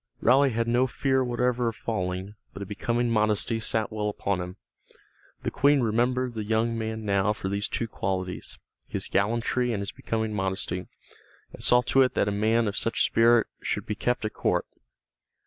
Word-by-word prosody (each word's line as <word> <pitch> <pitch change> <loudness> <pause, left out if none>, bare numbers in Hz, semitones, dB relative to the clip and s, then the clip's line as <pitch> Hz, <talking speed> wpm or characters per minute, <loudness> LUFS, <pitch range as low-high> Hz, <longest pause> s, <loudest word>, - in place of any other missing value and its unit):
Raleigh 135 +4 +5
had 115 -1 -1
no 120 +2 +3
fear 130 +1 +1
whatever 125 0 0
of 115 - -2
falling, 95 -3 -3 0.2
but 100 - -6
a - - -7
becoming 115 +4 -1
modesty 110 +1 +2
sat 110 0 0
well 105 -1 -1
upon 100 -2 -2
him. 90 +1 -6 0.9
The - - -1
Queen 140 -1 +4
remembered 125 +2 +1
the 110 -2 -3
young 110 +2 +1
man 110 -1 -4
now 100 0 +2
for 95 -2 -4
these 100 +1 -1
two 115 - -2
qualities, 95 -3 -3 0.3
his - - -4
gallantry 120 +4 +1
and 110 - -1
his 100 -1 -3
becoming 110 -1 -3
modesty, 95 -2 -2 0.7
and - - -9
saw 125 0 +5
to 135 +2 +3
it 130 - +2
that - - +2
a - - +1
man 110 +3 +2
of 100 - -2
such 115 - +1
spirit 115 0 +4 0.2
should - - -2
be - - -2
kept 120 +2 -1
at 110 - -3
court. - - 0
110 Hz, 180 wpm, -27 LUFS, 100-120 Hz, 0.9 s, Raleigh